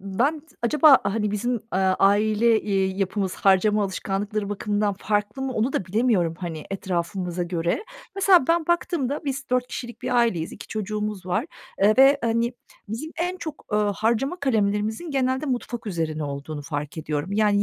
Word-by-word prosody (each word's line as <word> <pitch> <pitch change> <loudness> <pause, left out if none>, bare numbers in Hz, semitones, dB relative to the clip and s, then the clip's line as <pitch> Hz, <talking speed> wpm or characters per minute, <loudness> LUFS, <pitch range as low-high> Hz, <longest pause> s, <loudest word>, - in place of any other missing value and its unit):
ben 250 +11 0 0.2
acaba, 295 +2 +6
hani, 210 +1 0
bizim, 210 +4 -1 0.2
eee, 190 - +2
aile, 210 +4 +3
eee, 195 -2 +1
yapımız 195 -1 -1
harcama 205 +2 +3
alışkanlıkları 200 +2 -3
bakımından 205 0 -1
farklı 210 +5 -1
mı 265 - -2
onu 240 +3 0
da - - -1
bilemiyorum, 190 -5 +1
hani, 165 -4 -5
etrafımıza 180 -1 -2
göre. 175 - -1 0.3
Mesela 380 -7 +5
ben 335 -1 +2
baktığımda 320 -5 0
biz 275 -1 -3
4 250 0 +2
kişilik 240 -1 -7
bir 250 - -1
aileyiz, 210 -9 +1
2 - - -10
çocuğumuz 210 -2 -4
var, 210 - 0 0.4
eee, 210 +2 +6
ve, 275 +1 +7
hani, 230 +1 +1 0.4
bizim 230 +9 -5
en 355 +2 -1
çok, 315 -4 -7
ııı, 210 -1 +2
harcama 235 +9 0
kalemlerimizin 220 +3 0
genelde 260 +1 0
mutfak 245 -3 -3
üzerine 160 -5 -2
olduğunu 145 +1 -5
fark 145 +1 -5
ediyorum. 155 +4 -3
Yani 205 -1 +3
210 Hz, 155 wpm, -24 LUFS, 190-250 Hz, 0.4 s, ve